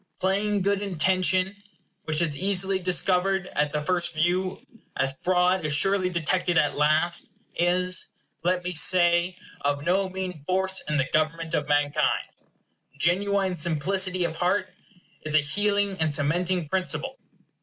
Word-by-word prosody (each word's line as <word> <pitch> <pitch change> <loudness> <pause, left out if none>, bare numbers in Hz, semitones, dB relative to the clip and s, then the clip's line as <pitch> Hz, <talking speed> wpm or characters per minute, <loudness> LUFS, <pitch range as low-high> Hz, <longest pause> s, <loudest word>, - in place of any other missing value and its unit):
Plain 200 +1 0
good 200 0 +1
intention, 185 +1 +1 0.5
which 155 +1 +1
is 165 - +1
as 145 - -1
easily 195 0 +2
discovered 185 +1 +1
at 150 0 0
the 150 - -2
first 175 0 0
view 180 +8 -1 0.3
as 135 0 +1
fraud 180 0 +2
is 150 -1 +1
surely 190 +3 +2
detected 175 +1 0
at 150 -3 +2
last, 155 +4 +1 0.2
is, 180 +1 +1 0.4
let 180 +1 0
me 180 0 -3
say, 175 0 +3 0.3
of 145 0 -1
no 190 +2 +1
mean 185 -5 -6
force 190 +1 0
in 150 - 0
the 135 - +1
government 160 +1 0
of - - -1
mankind. 145 0 +1 0.7
Genuine 190 +3 +1
simplicity 180 +3 0
of 165 -1 -3
heart 180 +4 0 0.5
is 155 0 -3
an 150 - +4
healing 200 +5 0
and 155 -2 +1
cementing 170 +4 0
principle. 185 -1 -3
180 Hz, 145 wpm, -25 LUFS, 155-190 Hz, 0.7 s, an